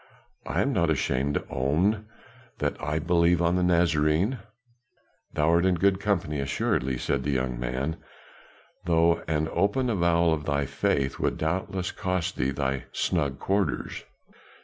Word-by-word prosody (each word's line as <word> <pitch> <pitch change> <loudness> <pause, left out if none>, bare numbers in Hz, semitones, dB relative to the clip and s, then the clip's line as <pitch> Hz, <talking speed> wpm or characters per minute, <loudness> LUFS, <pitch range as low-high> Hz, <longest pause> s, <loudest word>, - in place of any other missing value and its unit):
I - - +1
am - - 0
not - - +2
ashamed 70 +3 0
to - - -2
own 90 +12 +1 0.5
that - - -1
I 75 +2 -1
believe 85 +1 +3
on 85 +1 +2
the 90 - +1
Nazarene." 85 - +2 1.0
"Thou 75 0 +2
art 85 +1 +4
in 95 -1 +3
good 95 +2 +2
company, 90 -8 -1
assuredly," 65 -1 -1
said 70 +2 -1
the 70 - -3
young 65 -3 -1
man, 65 +6 -2 0.9
"though 85 0 +3
an 80 0 0
open 105 +8 +1
avowal 85 -4 +3
of 75 -1 -3
thy 70 -1 0
faith 70 0 -1
would - - 0
doubtless 90 +3 -2
cost 90 -3 -2
thee 65 - 0
thy 65 -1 -2
snug 70 -6 -1
quarters. 100 0 -1
80 Hz, 150 wpm, -26 LUFS, 70-90 Hz, 1.0 s, art